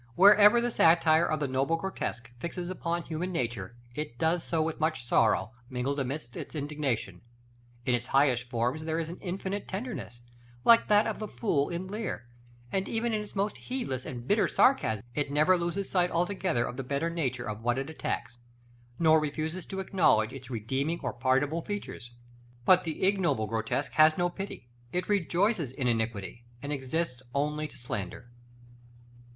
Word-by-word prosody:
Wherever 205 +4 +8
the 240 0 0
satire 165 -3 +5
of 155 - 0
the 145 - +1
noble 135 +5 +1
grotesque 165 -9 -4
fixes 175 +4 -4
upon 170 -2 -2
human 170 +4 -3
nature, 120 - -3 0.2
it 150 -3 -5
does 160 +4 +1
so 165 - -1
with 160 0 -3
much 155 -5 0
sorrow 110 -4 +3 0.2
mingled 130 +3 -2
amidst 130 -2 -4
its - - -7
indignation: 140 - -2 0.6
in 125 - +2
its 120 +1 -1
highest 130 -3 +2
forms 125 +6 -1
there 160 0 -1
is 165 -1 -2
an 175 - -8
infinite 195 +2 -4
tenderness, 190 - -6 0.4
like 230 0 +7
that 210 +1 +5
of - - -2
the 215 - -4
fool 155 -11 0
in 170 +2 -3
Lear; 195 - -4 0.5
and 190 0 -1
even 230 0 0
in 215 - 0
its 210 - -10
more 200 +1 +1
heedless 235 - -4
or - - -5
bitter 165 - +1
sarcasm, 115 - +3
it 145 0 -1
never 150 +6 +4
loses 175 +3 -2
sight 180 -2 +3
altogether 175 -6 0
of 125 - -6
the 135 - -3
better 140 +6 -1
nature 130 -7 -2
of 110 0 -5
what 120 +2 +1
it 135 0 -2
attacks, 120 -6 -4 0.6
nor 160 -1 +5
refuses 155 +4 -3
to 195 - -5
acknowledge 165 - +3
its 130 -2 -9
redeeming 130 +8 -2
or - - -2
pardonable 135 +6 +1
features. 200 -11 -6 0.5
But 185 -1 +6
the 160 -4 -4
ignoble 190 - +2
grotesque 110 +6 -2
has 155 0 +5
no 175 0 +2
pity: 190 -10 -7 0.2
it 180 - -2
rejoices 190 - +1
in 130 -1 -2
iniquity, 115 -1 -2 0.2
and 145 +3 -4
exists 135 0 -2
only 150 +2 0
to - - -14
slander. 120 0 -6
155 Hz, 170 wpm, -29 LUFS, 125-180 Hz, 0.6 s, Wherever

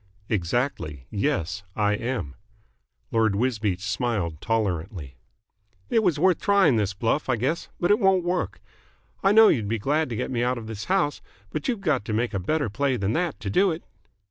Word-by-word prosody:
"Exactly. 85 - -1
Yes, 100 - -1
I 105 -1 +2
am." 115 - -3 0.8
Lord 110 -3 +2
Wisbeach 105 -5 0
smiled 105 - -2
tolerantly. 90 - -2 0.8
"It 225 - +4
was 180 -8 +2
worth 180 +2 +3
trying 200 - +4
the 105 -2 +1
bluff, 120 +7 0
I 130 - +3
guess, 135 +9 -2
but 175 - +2
it 210 - +4
won't 190 -3 +3
work. 175 +1 -2 0.6
I 195 - +4
know 220 +1 +8
you'd 110 -7 +1
be 115 +2 0
glad 145 +7 0
to 115 - -3
get - - -3
me 120 -2 0
out 125 +1 0
of 115 - -7
this 110 -2 -6
house, 180 -6 +1 0.3
but 155 - -3
you've 235 -5 -1
got 150 - +1
to 110 - -3
make 115 +3 0
a 100 - -1
better 145 - 0
play 130 +5 0
than 100 0 -1
that 175 0 -1
to 100 -3 -3
do 195 - +4
it." 165 0 -4
120 Hz, 190 wpm, -25 LUFS, 105-160 Hz, 0.8 s, know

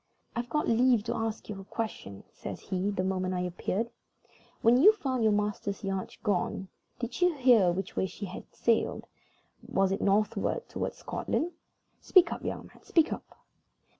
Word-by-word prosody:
"I've 240 +1 -3
got 300 - 0
leave 235 -1 +4
to 235 +2 -2
ask 225 -1 -3
you 195 -2 -6
a - - -10
question," 190 - -5
says - - -7
he, 190 +2 -2
the 200 -2 -1
moment 185 -1 -1
I 180 - 0
appeared. 185 +5 -2 0.7
"When 235 +2 +6
you 420 +7 +9
found 265 - -2
your 220 -1 +4
master's 205 0 -1
yacht 195 -1 -3
gone, 195 -2 -1 0.3
did 240 +7 -5
you 355 -2 +4
hear 245 -9 +5
which 190 +2 -4
way 190 - +1
she 200 - -7
had 185 - -8
sailed? 230 -1 +1 0.6
Was 195 0 +1
it 195 - -1
northward 205 +1 +1
toward - - -3
Scotland? 345 +3 -2 0.5
Speak 360 -2 +5
up, - - -8
young - - -4
man, - - -17
speak 330 -2 +2
up!" - - -11
210 Hz, 170 wpm, -30 LUFS, 190-240 Hz, 0.7 s, you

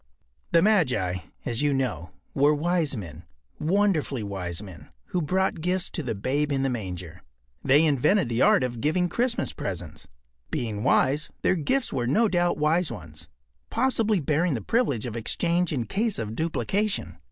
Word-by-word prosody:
” - - -43
The 165 - +5
magi, 125 - +2 0.3
as 120 +1 -2
you 145 -1 +2
know, 110 - -2 0.2
were 145 +2 +4
wise 160 -3 0
men—wonderfully 150 - -2
wise 90 -4 -4
men—who 95 - -7
brought 185 +2 0
gifts 180 +2 -1
to - - -2
the 115 - -3
Babe 145 +8 -1
in 135 -1 +1
the 135 - +1
manger. 90 -6 -6 0.4
They 140 +4 +5
invented 150 +4 +3
the 120 +1 -1
art - - +5
of 120 -2 -3
giving 175 +5 +1
Christmas 240 +3 0
presents. 80 -5 -6 0.4
Being 110 -3 -3
wise, 135 +4 +2
their - - +3
gifts 245 - 0
were 120 -3 -1
no 220 - +3
doubt 175 -3 +1
wise 155 +3 +2
ones, 80 -1 -8 0.4
possibly 225 -4 +1
bearing 155 +1 +1
the 115 - -3
privilege 220 - 0
of 120 -2 -5
exchange 170 +9 0
in 125 -6 -1
case 220 - 0
of 110 -1 -4
duplication. 195 - -1
145 Hz, 160 wpm, -26 LUFS, 110-180 Hz, 0.4 s, The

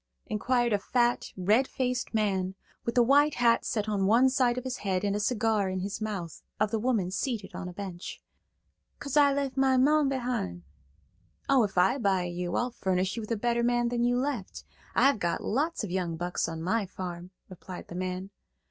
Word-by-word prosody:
inquired 240 +2 +1
a 205 - +2
fat, 240 +3 +1
red 215 +8 +3
faced 250 -1 -2
man, 190 -4 0 0.3
with 235 +1 -2
a 240 - +7
white 285 +4 +4
hat 235 -1 +3
set 215 -2 -2
on 200 -2 +1
one 240 +5 +5
side 250 -2 +2
of 255 - -3
his 260 0 -4
head 190 -2 -1
and 200 0 0
a - - 0
cigar 215 -2 +1
in 185 0 -2
his 200 +3 -4
mouth, 195 -7 -4 0.2
of 210 0 +1
the 225 - 0
woman 215 -6 0
seated 215 -1 -3
on 180 - -5
a - - -7
bench. 185 -1 -7 0.8
"'Cause 280 -2 -5
I 290 -1 +6
left 275 -1 -2
my 265 -1 +4
mon 290 +2 +4
behin'." 240 - -2 0.8
"Oh, 270 -3 +5
if 200 -3 -3
I 215 +10 +4
buy 195 -5 +2
you, 175 0 -3
I'll 245 +1 0
furnish 190 -4 -1
you 230 - -3
with 215 - -8
a 230 - +1
better 235 +2 +1
man 240 0 +2
than 240 0 0
you 245 0 +2
left. 255 -7 -3 0.3
I've 275 -4 +4
got 175 -3 -1
lots 300 +5 -1
of 200 - -4
young 175 -3 -2
bucks 175 0 -2
on 165 0 -5
my 205 +3 0
farm," 180 -1 -6 0.2
replied 185 0 -9
the - - -9
man. 185 +2 -4
215 Hz, 200 wpm, -28 LUFS, 185-250 Hz, 0.8 s, a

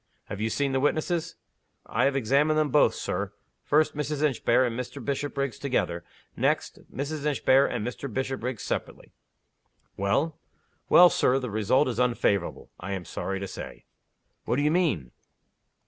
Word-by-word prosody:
"Have 100 - -5
you 110 - 0
seen 140 +4 0
the 135 - +1
witnesses?" 155 +4 0 0.5
"I - - +1
have 140 0 +2
examined 140 +5 +2
them 155 -1 +2
both, - - +4
Sir. - - -3 0.3
First, 155 +1 +2
Mrs. 150 0 -2
Inchbare 130 -3 +3
and 120 -2 -2
Mr. 125 +3 -5
Bishopriggs 140 0 -3
together. 90 - -1 0.3
Next, - - 0
Mrs. 145 +2 -4
Inchbare 140 -2 +3
and 110 -3 -3
Mr. 125 +2 -5
Bishopriggs 130 -1 -3
separately." - - -4 0.9
"Well?" 140 +11 0 0.5
"Well, 175 0 +8
Sir, 125 - +3
the 125 -4 -4
result 110 +7 +2
is 120 -2 -2
unfavorable, 120 -5 0
I 95 +2 -5
am 95 -3 -5
sorry 95 +4 -4
to 100 - -3
say." - - -9 0.6
"What - - 0
do 145 - +1
you 150 - +3
mean?" 145 - 0
135 Hz, 155 wpm, -27 LUFS, 110-145 Hz, 0.9 s, Well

